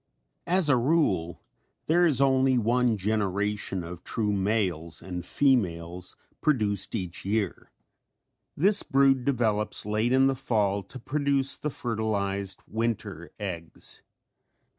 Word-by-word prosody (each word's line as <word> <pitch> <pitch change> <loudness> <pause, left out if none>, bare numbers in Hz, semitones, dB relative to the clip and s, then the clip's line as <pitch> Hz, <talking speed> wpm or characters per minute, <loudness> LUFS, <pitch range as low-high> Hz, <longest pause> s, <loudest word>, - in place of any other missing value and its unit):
As 180 -1 +2
a 145 - +5
rule 120 - +1 0.4
there 175 +2 +4
is 140 -6 +2
only 130 -1 +3
one 120 0 +2
generation 100 -1 -1
of 85 +1 -8
true 105 -2 -1
males 95 -5 -1
and 90 -2 -6
females 90 -9 0 0.3
produced 105 -9 +1
each 90 -5 -4
year. 100 -1 -2 0.9
This 195 +7 +6
brood 135 -1 +3
develops 110 -7 0
late 110 +3 0
in 130 +1 +5
the 135 - +3
fall 105 -7 0
to 100 - -11
produce 140 +1 0
the 150 - -3
fertilized 100 -6 -2
winter 105 -6 -3
eggs. 85 -5 -6
110 Hz, 120 wpm, -27 LUFS, 95-130 Hz, 0.9 s, This